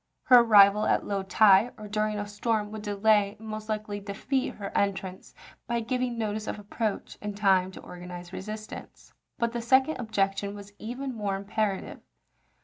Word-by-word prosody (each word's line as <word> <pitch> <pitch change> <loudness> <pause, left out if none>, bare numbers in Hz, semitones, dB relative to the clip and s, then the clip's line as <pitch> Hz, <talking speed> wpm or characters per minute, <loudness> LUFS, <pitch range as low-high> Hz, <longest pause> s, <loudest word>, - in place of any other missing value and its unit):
Her 250 -1 +8
arrival 210 -2 +6
at - - +2
low 200 -1 -1
tide, 195 +3 +5
or 215 -1 -8
during 215 0 -1
a 205 - -3
storm, 210 0 -1
would 215 -1 -6
delay 205 0 +2
and 220 +1 -11
most 215 0 -6
likely 215 -1 -3
defeat 215 +7 -2
her 200 -1 -7
entrance 190 -2 -2 0.3
by 235 -1 0
giving 250 0 -2
notice 215 -1 -3
of - - -3
approach 210 +1 -4
and 210 -1 -5
time 190 -3 +3
to 190 - -11
organize 180 0 -9
resistance. 215 +3 -8 0.2
But 235 0 0
the 240 0 -3
second 260 +6 +3
objection 200 -3 -1
was 205 0 -11
even 255 +4 -5
more 205 -4 -2
impera 200 0 -1
tive. - - -10
210 Hz, 170 wpm, -27 LUFS, 200-220 Hz, 0.3 s, Her